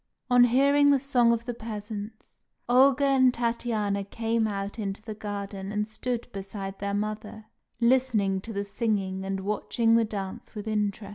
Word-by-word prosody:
On 245 0 +7
hearing 280 +4 +4
the 280 -1 +5
song 250 -3 +3
of 230 0 -1
the 245 - -3
peasants, 215 -1 -8 0.3
Olga 265 +3 +5
and 265 -2 +5
Tatiana 230 -4 -1
came 225 +2 -1
out 200 +1 -4
into 195 -2 -3
the 215 0 -7
garden 200 -2 -5
and 210 0 -1
stood 235 +2 -3
beside 195 0 -6
their 200 0 -2
mother, 215 +1 -4 0.3
listening 235 -6 +2
to 225 - -8
the 200 -1 -2
singing 195 -3 -1
and 195 0 -3
watching 220 +3 +1
the 230 - +3
dance 200 -1 -6
with 210 +1 -6
interest. 210 -1 -1
215 Hz, 160 wpm, -27 LUFS, 200-235 Hz, 0.3 s, On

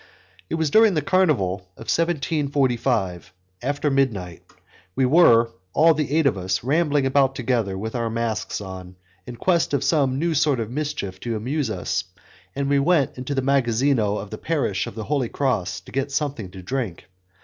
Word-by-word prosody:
It - - -1
was 160 -3 0
during 220 -1 +5
the 155 - 0
Carnival 145 - +2 0.2
of 115 - -10
1745, 135 - 0 0.3
after 145 +3 -1
midnight; 100 -11 -1 0.5
we 130 - +2
were, 120 -6 +5 0.2
all 165 +1 +5
the 150 -1 -1
eight 160 - +3
of 120 -8 +2
us, 95 +2 -2
rambling 145 0 +2
about 135 0 +2
together 115 -7 -1
with 110 +3 -5
our 115 -2 -1
masks 115 -2 -2
on, 95 -2 -8 0.3
in 125 - -7
quest 170 +1 +1
of 135 - -1
some 135 -5 +2
new 165 +3 0
sort 145 -3 +2
of 115 0 -4
mischief 125 -10 -4
to 115 +1 -3
amuse 130 +4 -2
us, 95 -5 -2 0.5
and 140 0 -1
we 140 0 +3
went 150 -1 +2
into 130 +3 -3
the 135 - 0
magazzino 125 -4 +2
of 100 0 -7
the 110 - -6
parish 140 - -1
of - - -8
the 110 - -5
Holy 135 -1 -1
Cross 100 -9 -1
to 90 - -15
get 135 +1 -2
something 135 - -2
to 95 0 -11
drink. 115 -5 -4
130 Hz, 180 wpm, -23 LUFS, 110-145 Hz, 0.5 s, during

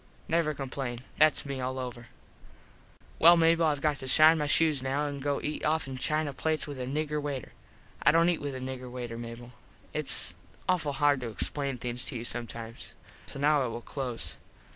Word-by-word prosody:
Never 160 -2 +1
complain. 130 -3 -4 0.2
Thats 155 -1 +4
me 135 -2 -4
all 130 +1 -3
over. 120 -2 -6 1.1
Well 170 +2 +8
Mable 165 0 +4
I 150 -2 +3
got 145 0 0
to 130 - -7
shine 155 +4 +7
my 150 - 0
shoes 155 -2 +3
now 135 +3 -1
and 140 -1 -4
go 145 +1 0
and - - -6
eat 150 - -3
offen 150 -4 0
china 155 0 -1
plates 155 +2 -1
with 145 -3 -7
a 125 - -3
nigger 150 +2 -1
waiter. 140 -4 -4 0.5
I - - +5
dont 165 +2 +4
eat 175 - 0
with 145 -2 -4
a - - -5
nigger 130 -1 -6
waiter, 120 -2 -6
Mable. 120 +1 -8 0.4
Its - - +3 0.3
awful 165 -6 +1
hard 145 -2 +2
to 120 - -4
explain 135 +4 -1
things 120 +1 -2
to - - -3
you 115 - -4
sometimes. 115 -1 -6 0.3
So - - -7
now 145 +1 +3
I 130 - 0
will 115 0 -5
close. 125 -2 -4
140 Hz, 195 wpm, -29 LUFS, 125-150 Hz, 1.1 s, Well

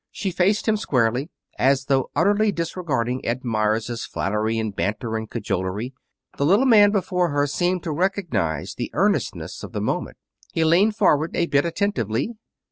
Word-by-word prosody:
She 195 -2 -3
faced 190 +6 +1
him 215 -1 +3
squarely, 125 - 0 0.3
as 135 +1 +3
though 135 -2 +1
utterly 205 +7 +3
disregarding 150 -9 -2
Ed 125 +3 -2
Meyers' 110 +1 0
flattery 110 +3 -1
and 110 -3 -2
banter 110 +4 -2
and 110 -1 -4
cajolery. 105 +2 -3 0.4
The - - 0
little 205 +10 +4
man 210 -5 +7
before 180 -3 0
her 145 -1 +1
seemed 175 +5 -1
to 165 - -3
recognize 170 - -1
the - - -4
earnestness - - 0
of - - -9
the - - -2
moment. - - -2 0.4
He 165 - +1
leaned 185 +7 +4
forward 165 -7 +2
a 170 - +2
bit 140 -2 +2
attentively. 165 - -1
145 Hz, 160 wpm, -23 LUFS, 115-185 Hz, 0.4 s, man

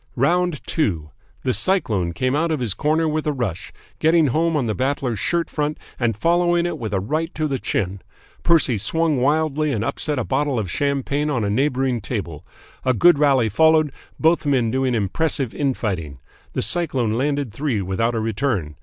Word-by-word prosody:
"ROUND 170 +5 +1
TWO 85 - -1 0.3
"The 130 - +1
Cyclone 110 - +1
came 130 - 0
out 165 +3 +1
of 155 -3 -1
his 115 -6 -1
corner 155 +6 +1
with 155 0 -2
a - - +2
rush, 120 - -4 0.3
getting 160 -2 +4
home 160 +4 +1
on 135 - 0
the 110 - -1
Battler's 130 -2 -1
shirt 170 -1 0
front 150 0 -2 0.2
and 115 -4 0
following 175 +4 +2
it 175 - -1
up 160 - -6
with 110 -2 -4
a 100 - 0
right 155 - -2
to 155 -1 0
the 135 -3 -2
chin. 95 -3 -2 0.4
Percy 155 -10 +3
swung 155 +6 0
wildly 155 +1 +1
and 110 -5 -1
upset 150 +3 -2
a 125 - 0
bottle 140 +1 0
of 100 -6 -2
champagne 140 +1 -1
on 125 -6 0
a 100 - 0
neighbouring 130 0 0
table. 95 - -5 0.4
A 130 -1 +2
good 175 +4 +5
rally 135 -6 +3
followed, 155 +6 +3 0.3
both 165 +2 +3
men 130 -6 +1
doing 130 -1 0
impressive 125 - 0
in 140 -3 0
fighting. 85 - -4 0.4
The - - +1
Cyclone 125 - +1
landed 140 -1 -1
three 135 -4 -1
without 100 +5 -1
a - - 0
return. 110 - -2
135 Hz, 190 wpm, -21 LUFS, 110-155 Hz, 0.4 s, good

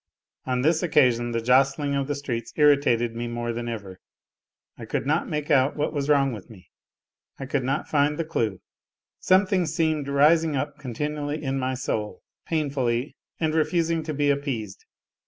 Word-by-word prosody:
On 125 -1 0
this 160 +2 +3
occasion 125 -8 +3
the 115 -1 -2
jostling 135 +3 +3
of 140 -1 -1
the 145 - -1
streets 120 -5 -4
irritated 140 -6 +3
me 120 +1 -3
more 120 0 -3
than 120 0 -4
ever. 100 -5 -7 0.8
I - - -10
could - - -2
not 155 +4 0
make 150 -1 -3
out 135 0 +3
what 150 +1 -1
was 145 -1 -2
wrong 135 -3 +3
with 105 +1 -9
me, 95 -5 -16 0.7
I 135 - -6
could 135 0 -1
not 135 +3 -1
find 150 0 +1
the 165 - -2
clue, 110 - -2 0.6
something 185 -2 +3
seemed 155 -2 0
rising 150 +3 +3
up 145 +2 -3
continually 150 +3 -4
in 135 -1 -1
my 130 0 -1
soul, 110 -4 -4 0.2
painfully, 135 -5 -1 0.2
and 160 -2 0
refusing 165 +1 +1
to 155 0 -4
be 145 0 +2
appeased. 130 -9 -4
140 Hz, 170 wpm, -25 LUFS, 120-150 Hz, 0.8 s, this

